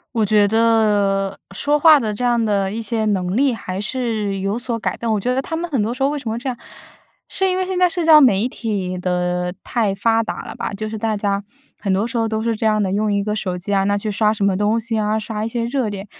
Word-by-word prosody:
我 220 -2 +2
觉 210 0 +4
得， 205 -3 +2
说 290 +9 0
话 315 0 +8
的 220 -6 -1
这 205 - -7
样 240 -1 +2
的 200 -3 +1
一 225 +3 -4
些 220 0 -2
能 190 -1 0
力 275 -1 +3
还 190 -4 -5
是 215 -3 -2
有 195 +4 -2
所 240 -1 -2
改 225 - -3
变， 235 - -3
我 215 - +2
觉 250 +5 0
得 265 - 0
他 325 - -5
们 340 0 -4
很 260 -7 +1
多 225 +3 -1
时 265 - -3
候 275 - +3
为 295 0 -3
什 245 - -5
么 225 - -2
这 260 +2 -4
样， 245 - -4 0.7
是 385 - +1
因 365 - 0
为 370 - 0
现 370 -1 -2
在 360 - +5
社 345 0 -1
交 320 -1 +8
媒 225 -7 +4
体 195 -7 -3
的 180 0 -1
太 215 -5 0
发 225 +3 +2
达 225 - -5
了 - - -8
吧。 - - -5
就 215 +2 -4
是 220 - -5
大 220 0 -1
家， 200 -1 -1 0.4
很 195 -2 -1
多 200 +4 +1
时 235 0 -3
候 225 - +1
都 220 0 -2
是 230 - 0
这 220 - -2
样 215 -1 +2
的， 190 - -1
用 210 +1 0
一 200 0 0
个 210 +1 -2
手 185 -4 -2
机 195 +3 -4
啊， 195 -1 +2
那 200 +1 +1
去 210 +1 -3
刷 210 +1 +2
什 205 -2 -3
么 195 -2 +2
东 210 +3 +1
西 230 0 -2
啊， 215 +1 0
刷 215 0 -3
一 - - -1
些 230 0 -2
热 240 -1 -1
点， 200 -1 -6
215 Hz, 295 characters per minute, -20 LUFS, 200-235 Hz, 0.7 s, 话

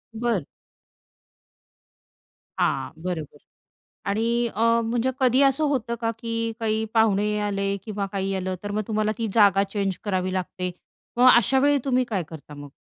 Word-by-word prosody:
बर. 225 -8 -1 2.1
हां. - - 0
बरोबर 170 -5 -4 0.7
आणि 215 +3 0 0.3
अ, 230 +1 +3
म्हणजे 235 +3 0
कधी 255 0 +4
असं 275 +2 +3
होतं 245 -4 -1
का, 225 -1 0
की 230 0 -2
काही 220 0 0
पाहुणे 210 -1 +3
आले 200 -1 -1
किंवा 205 -2 -3
काही 195 -1 -1
आलं, 185 0 -2
तर 205 - -5
मग 215 +1 -1
तुम्हाला 215 -1 0
ती 225 -1 -1
जागा 200 -3 +5
चेंज 195 -3 -1
करावी 185 -2 -1
लागते. 185 0 -3 0.5
मग 250 +1 +7
अशावेळी 265 +5 +3
तुम्ही 255 -2 +2
काय 195 -5 -1
करता 155 -2 -11
मग? 145 0 -9
215 Hz, 145 wpm, -24 LUFS, 195-235 Hz, 2.1 s, मग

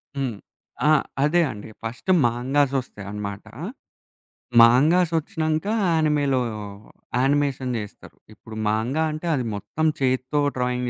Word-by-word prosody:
హ్మ్. 135 -5 -2 0.5
ఆ! - - +6 0.3
అదే 165 +4 +3
అండి. 105 +1 -9
ఫస్ట్ 115 +10 -6 0.2
మాంగాస్ 130 +4 +1
వస్తాయి 105 -5 -11
అన్నమాట. 100 -1 -5 1.2
మాంగాస్ 155 +9 +5
ఒచ్చినంకా 160 +1 -2 0.2
యానిమేలో 150 -5 +2 0.8
యానిమేషన్ 135 -1 +1
జేస్తారు. 105 -2 -9 0.2
ఇప్పుడు 110 +1 -12
మాంగా 115 +9 0
అంటే, 155 +3 -6
అది 130 -3 -2
మొత్తం 155 +9 -3
చేత్తో 130 +2 0 0.2
డ్రాయింగ్ 125 0 -1
130 Hz, 110 wpm, -23 LUFS, 115-150 Hz, 1.2 s, ఆ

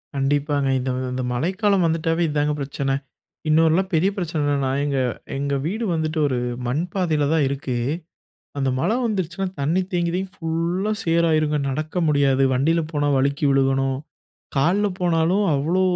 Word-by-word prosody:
கண்டிப்பாங்க. 140 +1 +1
இந்த, 130 +1 -3 0.2
இந்த 130 0 -2
மழைக்காலம் 190 - +1
வந்துட்டாவே 165 +1 0
இதாங்க 150 0 +1
பிரச்சன, 140 0 -2 0.6
இன்னொருலாம் 165 +5 +3
பெரிய 165 +5 +3
பிரச்சன 170 -5 -2
என்னனா 140 -2 +1
எங்க, 140 -2 0 0.4
எங்க 140 0 -1
வீடு 215 +8 -2
வந்துட்டு 160 0 -1
ஒரு 130 -3 -1 0.3
மண்பாதையில 160 +1 0
தான் 155 -3 +3
இருக்கு. 135 -2 -3 0.8
அந்த 135 -1 +1
மழை 215 - +1
வந்துடுச்சுனா 190 -3 -2
தண்ணீ 160 +7 +1
தேங்கி 170 -1 +1
தேங்கி 190 +1 -2
ஃபுல்லா 170 +5 -1
சேறு 170 0 +2
ஆயிடும்ங்க. 155 -1 +2
நடக்க 155 +5 -4
முடியாது, 140 -2 +3
வண்டியில 160 +6 +2
போனா 145 -2 0
வழுக்கி 140 +2 0
விழுகணும், 135 -1 +2 0.6
காலுல 185 +9 +3
போனாலும் 175 +3 +2
அவ்வளோ 165 +7 +1
155 Hz, 140 wpm, -22 LUFS, 140-175 Hz, 0.8 s, இன்னொருலாம்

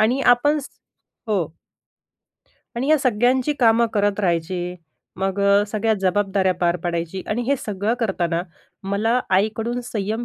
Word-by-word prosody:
आणि 240 +5 +2
आपण 275 +4 +4
स 285 - -7 0.6
हो. 200 -5 +1 1.3
आणि 260 +4 -1
या 310 - +5
सगळ्यांची 255 +2 +2
कामं 230 0 +5
करत 205 0 +1
राहायची. 175 0 -1 0.4
मग 195 +1 -2
अ, 200 +1 +4
सगळ्या 220 +1 0
जबाबदाऱ्या 195 0 +1
पार 175 0 +1
पाडायची 170 +2 -3
आणि 235 +3 -1
हे 275 +4 +1
सगळं 210 +1 -2
करताना 175 -6 0 0.4
मला 210 +5 +1 0.2
आईकडून 220 +5 0
संयम 220 +2 -3
205 Hz, 135 wpm, -22 LUFS, 190-235 Hz, 1.3 s, या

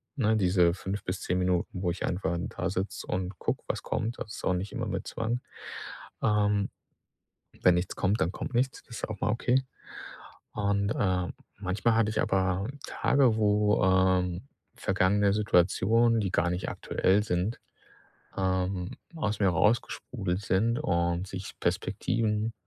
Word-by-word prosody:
ne, 110 -5 +2
diese 90 -3 +4
5 95 +2 -4
bis 90 +1 -2
10 90 - 0
Minuten, 90 0 0
wo 90 -2 +1
ich 90 - -3
einfach 90 -1 -1
'n 85 - -2
dasitze 95 +2 -3
und 90 -1 -3
gucke, - - -2
was - - -2
kommt. 115 +2 -2
Das 105 - -6
ist - - -8
auch 90 - +3
nicht 90 +3 -3
immer - - -2
mit - - -3
Zwang. 115 +2 -2 0.8
Ähm, 105 -1 +2 0.9
wenn 90 -1 +6
nichts 90 +2 -2
kommt, 100 +4 +1
dann 85 - +2
kommt - - -5
nichts, 130 +2 0
das 115 - -9
ist - - -3
auch 105 -3 -6
mal - - +1
okay 125 +3 +2 0.9
und, 100 -1 +1
äh, 95 -4 +1 0.3
manchmal 100 +4 +1
hatte 115 -2 +3
ich 110 - -1
aber 95 +1 +1 0.2
Tage 130 -6 +3
wo, 105 -1 +3
ähm, 95 +2 +2 0.3
vergangene 100 +2 +2
Situationen, 105 +4 +3
die 95 -3 -1
gar 90 - +2
nicht 90 +1 -2
aktuell 100 +3 +1
sind, 95 +3 -1 0.8
ähm, 95 -1 0 0.2
aus 110 -10 -1
mir 100 - +4
raus 105 +7 +3
gesprudelt 95 -6 -4
sind 110 +4 +1
und 85 +1 0
sich 95 0 -6
Perspektiven, 110 0 0
100 Hz, 155 wpm, -29 LUFS, 90-110 Hz, 0.9 s, wenn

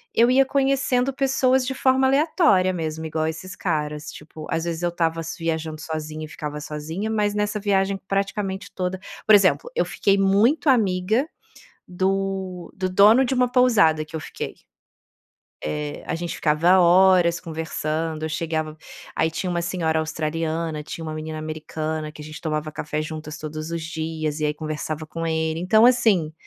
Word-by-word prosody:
eu 235 +2 +5
ia 270 +1 +5
conhecendo 270 -1 +1
pessoas 265 -1 +2
de 265 - -1
forma 265 0 +3
aleatória 275 - +3
mesmo, 160 -2 -4
igual 155 0 -1
esses 160 +4 -6
caras. 150 -3 -2
Tipo, 155 +1 -10
às 165 0 -1
vezes 170 0 -3
eu 175 - +1
tava 165 -1 0 0.2
viajando 160 -2 -3
sozinha 155 -1 -5
e - - -10
ficava 150 0 -6
sozinha, 160 +8 -4
mas, 210 -1 +1
nessa 210 0 -1
viagem, 195 -1 +1
praticamente 195 0 -2
toda 185 0 -2 0.3
por 215 - +9
exemplo, 200 - +3
eu - - +3
fiquei 200 0 +1
muito 210 +11 +3
amiga 215 +2 +2 0.7
do 190 -1 -2
do 185 -1 -1
dono 210 +7 +6
de 260 - 0
uma 250 -1 +3
pousada 215 -12 +4
que 155 - -19
eu 160 - -2
fiquei. - - -6 1.1
Eh, 75 -1 -4
a - - -2
gente 170 0 -4
ficava 170 +5 +3
horas 180 -1 +5
conversando, 160 -1 -3
eu - - -1
chegava 155 -1 -2 0.4
aí 160 0 +1
tinha 180 +3 -3
uma 175 -1 0
senhora 170 -2 0
australiana, 160 0 -2
tinha 165 +2 -7
uma 155 - -4
menina 155 0 -5
americana 155 0 -4
que 150 - -11
a - - -9
gente 155 +1 -9
tomava 155 -2 -3
café 150 0 -3
juntas 155 0 -6
todos 155 +1 -6
os 170 -1 -3
dias, 160 -2 -3
e 155 - +1
aí 150 - -1
conversava 155 0 -4
com 165 +1 -4
ele. 160 0 -1
Então, 215 +5 +4
assim, 215 -10 +4
165 Hz, 170 wpm, -23 LUFS, 155-200 Hz, 1.1 s, por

